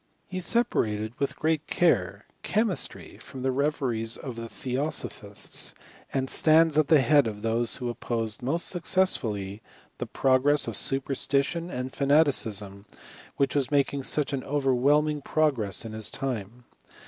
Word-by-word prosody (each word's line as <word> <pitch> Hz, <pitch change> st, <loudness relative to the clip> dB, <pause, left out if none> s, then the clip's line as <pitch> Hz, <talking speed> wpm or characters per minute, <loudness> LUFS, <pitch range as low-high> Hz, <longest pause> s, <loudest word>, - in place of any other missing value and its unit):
He 185 Hz, -, -5 dB
separated, 110 Hz, -, 0 dB
with 140 Hz, -, -1 dB
great 155 Hz, -1 st, -1 dB
care, 175 Hz, -1 st, +1 dB, 0.2 s
chemistry 215 Hz, -4 st, -2 dB
from 130 Hz, -2 st, -9 dB
the 130 Hz, -, +1 dB
reveries 130 Hz, -5 st, -1 dB
of 130 Hz, -4 st, -7 dB
the 115 Hz, 0 st, -7 dB
theosophists, 135 Hz, +5 st, -3 dB, 0.4 s
and 130 Hz, -1 st, -1 dB
stands 160 Hz, +2 st, +4 dB
at 155 Hz, -, +2 dB
the 155 Hz, -4 st, +5 dB
head 145 Hz, -2 st, +4 dB
of 105 Hz, -1 st, -6 dB
those 115 Hz, +1 st, +2 dB
who 125 Hz, -, -4 dB
opposed 115 Hz, -1 st, -3 dB
most 150 Hz, +7 st, +2 dB
successfully 115 Hz, -, +1 dB, 0.4 s
the -, -, -4 dB
progress 135 Hz, +2 st, +2 dB
of 115 Hz, -, -4 dB
super 135 Hz, 0 st, 0 dB
stition 140 Hz, +6 st, 0 dB
and 125 Hz, +1 st, -5 dB
fanaticism, 110 Hz, -9 st, +1 dB, 0.5 s
which 140 Hz, -1 st, +1 dB
was 140 Hz, -3 st, 0 dB
making 140 Hz, -1 st, +1 dB
such 145 Hz, +1 st, +1 dB
an 135 Hz, -, -2 dB
overwhelming 145 Hz, +2 st, +1 dB
progress 135 Hz, -, 0 dB
in 110 Hz, -, -6 dB
his 110 Hz, -1 st, 0 dB
time. 120 Hz, -3 st, -5 dB
135 Hz, 140 wpm, -26 LUFS, 115-150 Hz, 0.5 s, the